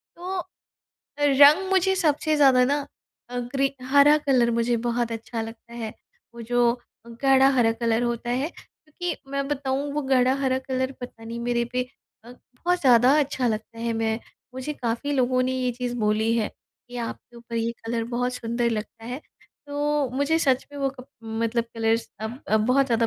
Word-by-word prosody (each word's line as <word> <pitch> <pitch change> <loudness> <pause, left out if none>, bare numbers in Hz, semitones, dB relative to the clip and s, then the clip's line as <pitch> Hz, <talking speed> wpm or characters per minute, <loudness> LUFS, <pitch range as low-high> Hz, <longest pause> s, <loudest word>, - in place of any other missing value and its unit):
तो 365 +2 -4 0.8
रंग 290 +6 +6
मुझे 380 0 +3
सबसे 310 -3 +1
ज़्यादा 265 -3 +6
ना 285 +2 0 0.4
अ, 245 - -3
ग्री 270 +3 -1 0.2
हरा 285 +2 +7
कलर 260 -5 +2
मुझे 235 +1 +1
बहुत 240 -1 0
अच्छा 230 +1 -5
लगता 225 +1 -10
है। 230 -2 -5 0.4
वो 235 - -8
जो 245 +2 +1 0.6
गाढ़ा 270 0 +6
हरा 230 -2 +4
कलर 230 0 0
होता 240 0 -2
है 260 +5 0
क्योंकि 325 +2 -7
मैं 275 0 -1
बताऊँ 280 0 -1
वो 300 +1 -1
गाढ़ा 260 -1 +3
हरा 260 -1 +1
कलर 260 0 -1
पता 245 -2 -9
नहीं 230 +1 -6
मेरे 240 0 0
पे 250 0 +1 0.4
अ, 235 - -12
बहुत 350 +9 -3
ज़्यादा 250 -2 +6
अच्छा 275 -3 0
लगता 225 +1 -4
है। 230 0 -1
मैं 225 0 0 0.4
मुझे 260 +3 -4
काफ़ी 245 +1 -2
लोगों 255 -2 +2
ने 255 +1 0
ये 250 -1 0
चीज़ 245 0 -4
बोली 215 +1 +1
है 220 -2 0 0.4
कि 245 - -8
आपके 240 0 -6
ऊपर 235 0 -7
ये 230 0 0
कलर 230 0 -1
बहुत 250 +1 0
सुंदर 235 0 -1
लगता 225 0 -5
है। 250 +4 -5 0.5
तो 290 -1 0
मुझे 285 +4 +2
सच 270 -5 +1
में 285 - -7
वो 275 -1 +1
कप 255 -1 -13 0.2
मतलब 225 +1 -1
कलर्स 225 0 0
अब 220 +3 -5
अब 215 - +5
बहुत 270 +2 +3
ज़्यादा 230 -2 +2
250 Hz, 180 wpm, -25 LUFS, 230-275 Hz, 0.8 s, हरा